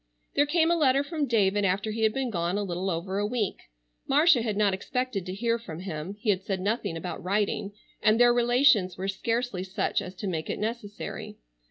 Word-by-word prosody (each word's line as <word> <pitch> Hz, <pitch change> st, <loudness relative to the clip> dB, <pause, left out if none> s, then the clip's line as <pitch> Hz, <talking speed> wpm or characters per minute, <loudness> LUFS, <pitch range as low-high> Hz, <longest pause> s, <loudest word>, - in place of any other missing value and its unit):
There 290 Hz, +1 st, +3 dB
came 330 Hz, +2 st, +3 dB
a -, -, +4 dB
letter 275 Hz, -4 st, +3 dB
from 300 Hz, -1 st, -2 dB
David 205 Hz, -3 st, +2 dB
after 200 Hz, +3 st, 0 dB
he 225 Hz, +1 st, -4 dB
had 220 Hz, -1 st, +4 dB
been 260 Hz, 0 st, -2 dB
gone 175 Hz, 0 st, -1 dB
a 205 Hz, -, -1 dB
little 185 Hz, 0 st, -2 dB
over 185 Hz, +3 st, -2 dB
a 205 Hz, -, +1 dB
week. 220 Hz, -3 st, -2 dB, 0.5 s
Marcia 295 Hz, -1 st, +5 dB
had 215 Hz, -3 st, -2 dB
not 205 Hz, -2 st, +3 dB
expected 235 Hz, -1 st, -3 dB
to 185 Hz, -, -4 dB
hear 230 Hz, +2 st, 0 dB
from 170 Hz, -7 st, -8 dB
him. 180 Hz, 0 st, -5 dB
He 215 Hz, -1 st, +2 dB
had 190 Hz, -1 st, -1 dB
said 195 Hz, -1 st, -3 dB
nothing 200 Hz, -3 st, -1 dB
about 175 Hz, +2 st, -6 dB
writing, 200 Hz, +1 st, -1 dB, 0.3 s
and 215 Hz, +1 st, +4 dB
their 240 Hz, 0 st, +6 dB
relations 240 Hz, -6 st, +3 dB
were 190 Hz, +1 st, -3 dB
scarcely 225 Hz, 0 st, -1 dB
such 190 Hz, 0 st, -1 dB
as 185 Hz, 0 st, -8 dB
to 205 Hz, -, -6 dB
make 165 Hz, -5 st, -3 dB
it -, -, -2 dB
necessary. 215 Hz, -1 st, -5 dB
210 Hz, 210 wpm, -27 LUFS, 190-240 Hz, 0.5 s, their